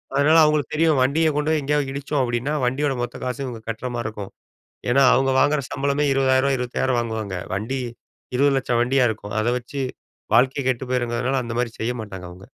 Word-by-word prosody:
அதனால 150 +3 +5
அவுங்களுக்கு 150 -3 +1
தெரியும், 155 -3 +3
"வண்டிய 155 +4 +2
கொண்டு 150 +1 0
போயி 155 -2 +1
எங்கேயாவது 145 -1 0
இடிச்சோம்." 140 0 -1
அப்படீன்னா, 120 +4 -1
வண்டியோட 135 +3 0
மொத்த 120 0 -4
காசும் 130 +2 -3
இவுங்க 115 -3 -7
கட்ற 115 +3 -4
மாரி 120 -1 -3
இருக்கும். 105 -3 -7 0.6
ஏன்னா, 135 +3 +4
அவுங்க 135 +1 +2
வாங்குற 145 -1 +3
சம்பளமே 140 +1 0
ரூ.20,000 135 0 +3
ரூ.25,000 125 0 0
வாங்குவாங்க. 110 -5 -4 0.2
வண்டி 130 +6 -3 0.6
20 140 0 +3
லட்சம் 125 -2 0
வண்டியா 125 +1 +3
இருக்கும். 105 -1 -8
அத 110 - -1
வச்சு 135 +3 -6 0.5
வாழ்க்கை 130 +3 +3
கெட்டு 130 +1 -1
போயிருங்கிறதனால, 125 +1 0
அந்த 115 0 -5
மாரி 120 -2 -1
செய்ய 120 +2 0
மாட்டாங்க 95 -4 -8
அவுங்க. 95 +2 -13
130 Hz, 180 wpm, -22 LUFS, 120-140 Hz, 0.6 s, அதனால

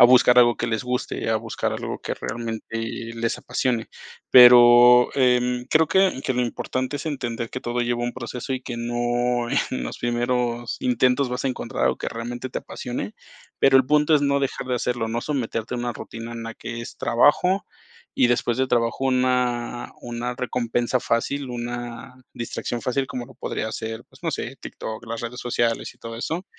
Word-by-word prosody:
a - - +11
buscar 125 0 +6
algo 120 -1 +6
que - - -2
les 110 +2 -1
guste, 125 -2 -2
a 110 - +2
buscar 110 - -2
algo - - -4
que - - -3
realmente 115 -1 -5 0.5
les 115 0 -1
apasione. 120 -4 -1 0.4
Pero, 120 0 +9
em, 125 -1 +2
creo 160 0 +3
que 190 -8 +3
que - - +1
lo 125 - 0
importante 130 +3 -2
es 145 +3 -4
entender 120 -6 -3
que - - -4
todo 120 +1 -2
lleva 120 0 0
un 120 - -2
proceso 125 +1 -5
y 130 - -2
que 120 -2 -6
no 120 0 0
en 65 - -1
los - - -5
primeros 120 0 -1
intentos 125 +2 +2
vas 125 +2 -3
a - - +2
encontrar 130 - -4
algo - - +1
que - - -3
realmente 120 +2 -5
te - - -3
apasione, 120 -4 -6 0.4
pero 135 -1 +6
el 130 - +5
punto 150 +1 +4
es 145 - +3
no 140 0 +2
dejar 135 -1 -3
de 125 - +1
hacerlo, 120 -2 -1
no 120 +1 -2
someterte 125 -5 -3
a - - -2
una 120 0 -2
rutina 115 +1 -8
en 115 -1 -6
la 115 - -6
que 120 0 -6
es 115 - -8
trabajo, 180 - +3 0.5
y - - +4
después 120 0 +1
de 130 0 +1
trabajo 120 +2 0
una 125 -2 0
una 120 +1 -4
recompensa 120 0 -1
fácil, 130 +4 -1
una 120 0 -6 0.2
distracción 120 0 -4
fácil 135 +1 0
como 120 0 -5
lo - - -16
podría 110 - -4
ser, 110 0 -5
pues, - - -20
no - - 0
sé, - - -4
TikTok, 110 +1 -7
las 115 0 -4
redes 120 +1 -6
sociales 120 -1 -1
y - - -30
todo 115 0 -7
eso, 165 +9 -3
120 Hz, 190 wpm, -23 LUFS, 120-125 Hz, 0.5 s, a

